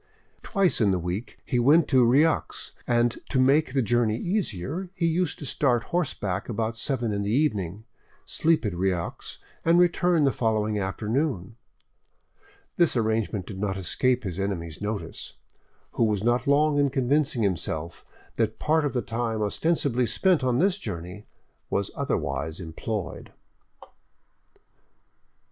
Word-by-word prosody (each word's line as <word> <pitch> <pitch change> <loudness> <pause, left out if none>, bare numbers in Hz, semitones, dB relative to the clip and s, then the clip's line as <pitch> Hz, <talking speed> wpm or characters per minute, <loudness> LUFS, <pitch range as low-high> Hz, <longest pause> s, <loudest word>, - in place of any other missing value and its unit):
Twice 195 - +1
in 105 - +4
the 95 - +2
week 90 +6 -4
he 125 - 0
went 145 +6 +5
to 130 -3 +5
Rieux, 140 +7 +2 0.2
and 120 0 +2
to 130 - +1
make 135 +2 +3
the 135 -2 +2
journey 115 0 +1
easier, 175 - -2
used 170 -1 0
to 145 - -8
start 125 -4 +1
horseback 105 - -1
about 115 0 -2
seven 120 -2 -1
in 100 - -1
the 100 - -2
evening, 105 - 0 0.4
sleep 160 -5 +1
at 105 - -1
Rieux, 90 -1 -2 0.3
and 165 +1 +4
return 175 -2 +3
the 135 - +4
following 110 -3 0
afternoon. 110 - -2 1.2
This 170 -7 +3
arrangement 110 -3 0
did 95 -1 -8
not 100 -1 -1
escape 125 +7 0
his 95 -2 -4
enemy's 85 -5 -3
notice, 105 0 -5 0.6
who 115 - +1
was 105 -2 0
not 120 +3 +1
long 145 +1 +3
in 140 -1 +3
convincing 135 -1 +1
himself 85 -4 -2 0.3
that 110 -1 0
part 155 0 +2
of 145 - -1
the 125 - -1
time 115 -2 -2
ostensibly 125 +1 0
spent 180 - +2
on 125 -1 +2
this 190 +5 +2
journey 90 - -7 0.4
was 100 0 -1
otherwise 80 +2 -2
employed. 90 +4 -5
120 Hz, 140 wpm, -26 LUFS, 100-145 Hz, 1.2 s, went